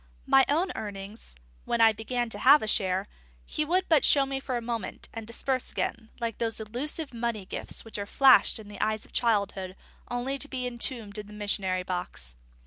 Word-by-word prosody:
My 270 - +6
own 340 +6 +2
earnings, 205 - -6 0.3
when 235 - 0
I 225 -1 +7
began 240 +3 -2
to 205 - -3
have 280 +5 +7
a - - -2
share, 190 -2 +1 0.4
he 305 - -1
would 360 +5 +1
but 315 -4 +4
show 280 -2 +6
me 270 0 -3
for 260 -2 -3
a - - -1
moment, 230 -1 -5
and 225 -1 -7
disperse 255 +2 -1
again, 225 -1 -3
like 230 -3 -3
those 225 -1 0
illusive 260 +7 -3
money 230 -4 -2
gifts - - -4
which 225 -2 -6
are 200 - -4
flashed 265 +2 +6
in 215 -2 -11
the 205 -1 -8
eyes 215 0 0
of - - -21
childhood 200 -5 0 0.3
only 255 +3 -2
to 290 - 0
be 255 -3 -3
entombed 235 -3 -2
in 210 - -7
the 210 - -12
missionary 195 -3 -1
box. 180 - -4
230 Hz, 200 wpm, -28 LUFS, 205-260 Hz, 0.4 s, I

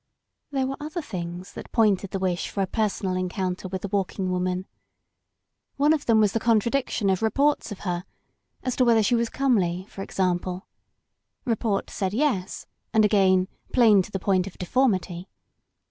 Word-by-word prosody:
There 270 -2 0
were 270 +1 -3
other 310 +3 -5
things 175 -4 -6
that - - -9
pointed 205 -4 +2
the 195 - -3
wish 185 -2 -1
for 200 - -1
a - - +1
personal 200 -2 -1
encoimter 185 0 -2
with 190 -1 -4
the - - -1
Walking 190 -1 -1
Woman. 180 0 -1 1.1
One 295 +3 +4
of 300 -2 -2
them 225 -2 +5
was 210 -2 +4
the 225 - +1
contradiction 230 0 +1
of 190 - 0
reports 275 +4 +1
of 205 - -7
her 180 -1 -3 0.3
— - - -36
^as 255 - -1
to 255 - +4
whether 230 -3 +4
she 210 - +2
was 235 -1 +1
comely, 190 -10 +1
for 195 - -8
example. 185 0 -1 0.8
Report 225 -4 -1
said 195 0 -2
yes, 230 -9 -1 0.3
and 220 -1 +4
again, 190 -3 +4 0.3
plain 220 -6 +6
to 185 - -7
the 195 - -1
point 190 0 +1
of 195 - -10
deformity. 185 -4 0
200 Hz, 175 wpm, -25 LUFS, 185-235 Hz, 1.1 s, plain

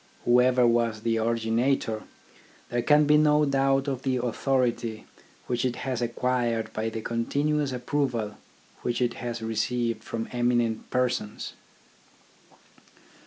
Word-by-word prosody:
Whoever 125 +1 +5
was 115 -2 +2
the 115 0 0
originator, 115 0 0 0.7
there 120 0 0
can 150 +4 +5
be 150 +1 +5
no 150 0 +4
doubt 135 0 +2
of 135 -2 -2
the 130 -1 0
authority 120 -2 -1 0.4
which 120 -1 -1
it 125 -1 0
has 130 -2 -3
acquired 120 -1 -1
by 110 +1 -1
the 110 0 -5
continuous 145 +5 0
approval 125 -4 -2 0.4
which 120 - -1
it 120 -1 +1
has 120 -2 -4
received 115 +1 -1
from 115 0 -4
eminent 120 -2 0
persons. 125 -4 -1
120 Hz, 120 wpm, -27 LUFS, 115-130 Hz, 0.7 s, Whoever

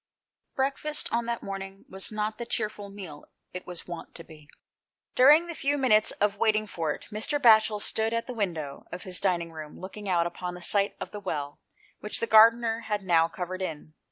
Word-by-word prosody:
Breakfast 280 +3 -1
on 235 0 0
that 235 -1 -3
morning 195 0 -7
was 190 +2 -3
not 215 +1 -3
the 235 - -4
cheerful 210 -2 -3
meal 185 -7 -10 0.3
it 180 - -7
was 180 -2 -5
wont 175 -1 -8
to 165 - -8
be. 155 -2 -16 0.7
Buring 300 +7 +7
the 340 - -5
few 290 -2 0
minutes 215 -6 +4
of 205 0 0
waiting 215 0 +2
for 165 -6 -2
it - - -7
Mr. 220 +7 -1
'Batchel 220 -4 +5
stood 220 +2 +1
at 230 0 -1
the 250 - -6
window 165 - -4
of 175 - -6
his 185 -1 -2
dining 170 -3 0
room 155 -2 -9
looking 200 +2 -7
out 170 -2 +2
upon 180 +1 -5
the 180 - -10
site 200 +2 +2
of - - -6
the 210 - -6
well 145 -7 -4 0.4
which 210 - -3
the - - +1
gardener 225 +1 +6
had 210 -1 -1
now 165 -3 +4
covered 180 +2 -5
in. 155 -3 -5
200 Hz, 200 wpm, -27 LUFS, 175-225 Hz, 0.7 s, Buring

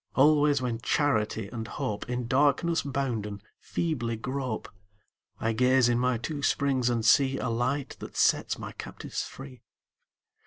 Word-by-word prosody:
Always 145 -1 +4
when 120 -2 -2
Charity 110 -8 +1
and 110 -1 -5
Hope, 105 +2 -4
In 125 0 -2
darkness 145 +6 +2
bounden, 120 -8 -3 0.2
feebly 125 -9 -2
grope, 130 0 -4 0.7
I 115 0 0
gaze 125 +1 +4
in 120 0 +2
my 125 -1 +1
two 145 +5 -4
springs 135 -3 +1
and 115 -2 0
see 135 +3 +5
A 125 - -2
Light 125 +4 -1
that - - -9
sets - - +2
my - - -7
captives - - -6
free. 65 -1 -9
125 Hz, 145 wpm, -28 LUFS, 115-140 Hz, 0.7 s, see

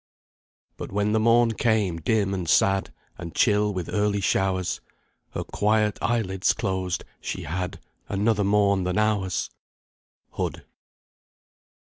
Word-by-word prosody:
But - - -7
when 105 +1 0
the 110 - +2
morn 115 +1 +4
came 110 -7 +1
dim 100 +3 0
and 90 -4 -3
sad, 95 +3 +3 0.3
And 85 -1 -7
chill 105 0 +3
with 90 -4 -4
early 105 -1 0
showers, 95 -1 0 0.5
Her - - -3
quiet 105 0 +1
eyelids 95 -6 +1
closed 95 -2 -2 0.2
she - - -5
had 90 +4 -4 0.3
Another 105 +1 +1
morn 100 -1 +3
than 90 0 -1
ours! 105 -4 0 0.8
HOOD. - - -4
100 Hz, 120 wpm, -25 LUFS, 95-105 Hz, 0.8 s, morn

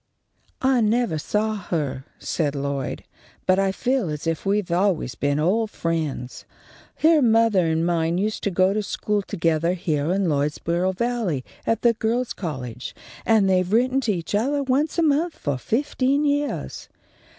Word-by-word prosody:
_ 260 - +2
"I 260 -2 +4
nevah 220 -5 +1
saw 215 +7 0
her," 150 -9 -3
said 150 -3 -2
Lloyd, 140 -1 -3 0.4
"but 185 +1 +3
I 195 0 +2
feel 245 -2 0
as 150 +1 -5
if 165 +3 -2
we 200 +1 +3
had 195 -5 -3
always 180 - +1
been 140 +5 0
old 210 +8 +1
friends. 160 -9 -3 0.6
Her 320 -1 +6
mothah 225 -4 +4
and 160 0 +1
mine 170 0 +1
used 215 +3 -1
to - - +2
go 185 +1 +2
to 215 - 0
school 210 0 -1
togethah 165 -3 0
heah 155 -4 -1
in 195 +2 +1
Lloydsboro 165 +5 0
Valley 225 - -1 0.2
at 225 -1 0
the 235 -1 +5
Girls' 230 +2 -1
College, 130 - -6 0.3
and 220 -3 +4
they've 185 -1 +2
written 255 +4 +3
to 230 - 0
each 170 0 -5
othah 275 +7 +1
once 275 +5 0
a 335 - +3
month 315 +3 +1
for 140 -3 -2
fifteen 275 - 0
yeahs. 290 0 -2
195 Hz, 165 wpm, -23 LUFS, 160-235 Hz, 0.6 s, Her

